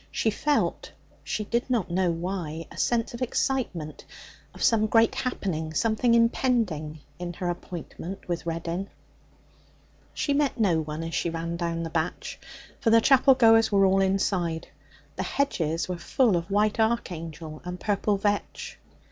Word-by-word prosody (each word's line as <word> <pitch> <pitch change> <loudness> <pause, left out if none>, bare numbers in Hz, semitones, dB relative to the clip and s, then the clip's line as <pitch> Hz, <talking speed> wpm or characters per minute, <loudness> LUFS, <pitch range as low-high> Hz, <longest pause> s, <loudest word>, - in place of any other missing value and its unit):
She 220 - 0
felt, 290 +7 0 0.3
she 215 - -2
did 235 +4 -1
not 230 -9 0
know 180 0 +2
why, 165 -2 -3
a - - -12
sense 235 -1 +1
of 235 - -7
excitement, 235 - -2 0.5
of - - -7
some 220 -2 +4
great 225 +1 +4
happening, 160 -10 -3
something 230 - +2
impending, 225 - +1 0.2
in 175 -1 -4
her 175 +1 -3
appointment 175 +2 -7
with 170 -3 -2
Reddin. 170 +3 -3 1.3
She 285 - 0
met 280 -3 +1
no 185 -7 +3
one 155 +1 -5
as 165 0 -5
she 170 - 0
ran 165 +1 -3
down 170 -1 -2
the 165 - -5
batch, 160 +1 -3 0.4
for 245 - +1
the 230 0 +7
chapel 270 +2 +5
goers 225 -3 +5
were 195 -1 +5
all 195 0 +4
inside. 190 -4 0 0.5
The - - -1
hedges 165 - -1
were 180 -2 -4
full 230 +3 +2
of 170 +2 -2
white 210 +2 +2
'archangel' 165 -8 -2
and 180 0 -6
purple 205 0 0
vetch. 205 +1 -2
190 Hz, 155 wpm, -26 LUFS, 165-225 Hz, 1.3 s, the